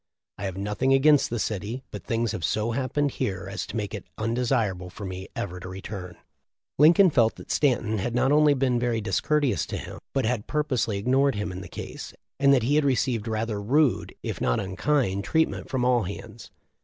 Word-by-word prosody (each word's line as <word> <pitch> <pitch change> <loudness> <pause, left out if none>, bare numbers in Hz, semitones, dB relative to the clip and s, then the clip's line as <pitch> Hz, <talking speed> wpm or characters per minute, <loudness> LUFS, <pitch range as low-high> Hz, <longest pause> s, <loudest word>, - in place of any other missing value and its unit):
I 100 - -3
have 95 -1 -4
nothing 105 +7 +1
against 145 +1 +4
the 120 - -2
city, 110 +4 -3
but 100 -4 -7
things 115 -1 0
have 85 - -5
so 110 +7 0
hap 130 +1 -2
pened 145 -1 +1
here 95 -3 -3
as 100 +3 -4
to - - -8
make 105 -2 -3
it 105 - -6
undesirable 115 -5 0
for 100 +3 -8
me 95 0 -6
ever 90 +1 -4
to 90 - -8
return.' 95 -1 -7 0.6
Lincoln 170 +4 +7
felt 115 -5 +3
that - - -9
Stanton 115 -6 +1
had 120 +5 -2
not 130 +2 +3
only 150 -1 +5
been 130 -2 +1
very 120 -2 0
discourteous 145 +5 +1
to - - -4
him, - - -8
but 135 -4 0
had 115 -2 -1
pur 150 0 0
posely 120 -7 -1
ignored 130 +5 +2
him 105 -1 -3
in 90 +1 -6
the 90 - -8
case, - - -8 0.2
and 140 0 +5
that 130 -4 +4
he 130 +5 +1
had 150 0 +4
received 125 -4 +1
rather 110 -1 -2
rude, 140 +6 +1
if - - -4
not - - +1
unkind, 100 +1 0
treatment 160 +6 0
from 130 -2 0
all 125 -1 +3
hands. 110 +4 -8
115 Hz, 205 wpm, -26 LUFS, 100-135 Hz, 0.6 s, Lincoln